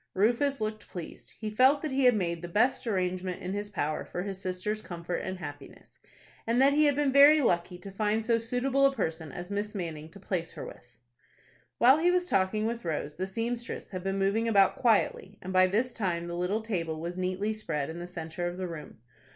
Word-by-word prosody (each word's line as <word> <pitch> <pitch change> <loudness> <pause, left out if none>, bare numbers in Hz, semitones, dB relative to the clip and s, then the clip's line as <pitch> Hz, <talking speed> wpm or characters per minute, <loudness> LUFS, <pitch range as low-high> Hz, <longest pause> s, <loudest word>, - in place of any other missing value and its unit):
Rufus 240 +7 +2
looked 215 0 -4
pleased. 175 -3 -9
He 215 -1 -4
felt 260 +6 +4
that 310 - -2
he 265 0 +2
had 250 -2 +6
made 170 -4 -1
the 175 - -5
best 235 +8 +1
arrangement 185 -3 -1
in 185 +1 -4
his 205 0 -4
power 155 -6 -2
for 180 - -5
his 195 -1 -5
sister's 190 +3 -3
comfort 175 -1 -5
and 185 0 -4
happiness, 145 -5 -10 0.5
and 235 +2 +2
that 275 +1 +6
he 305 +1 +4
had 290 -2 +4
been 290 -1 +2
very 285 +2 +8
lucky 180 -8 +1
to 195 +2 -9
find 215 +2 0
so 230 0 +3
suitable 250 +4 0
a 275 - -2
person 160 - -3
as 175 +2 -7
Miss 210 +2 -3
Manning 160 -4 -5
to 200 - -14
place 180 -3 -3
her - - -7
with. 125 -1 -13 0.8
While 260 +5 +6
he 345 +2 +3
was 360 0 +2
talking 205 - +1
with 235 +1 -3
Rose, 150 -3 -3
the 185 +1 -2
seamstress 230 +4 -4
had 185 -2 -6
been 195 0 -1
moving 200 +4 +1
about 195 -4 +4
quietly, 210 -3 +1
and 185 +1 -6
by 185 0 +6
this 230 +6 0
time 175 -5 -1
the 170 0 -5
little 180 +5 -1
table 165 -8 -2
was 170 +2 -4
neatly 185 +4 -1
spread 155 -10 -3
in 160 +2 -6
the 175 - -6
centre 175 0 -5
of 175 +1 -5
the 185 -1 -3
room. 165 -3 -8
195 Hz, 215 wpm, -29 LUFS, 175-230 Hz, 0.8 s, very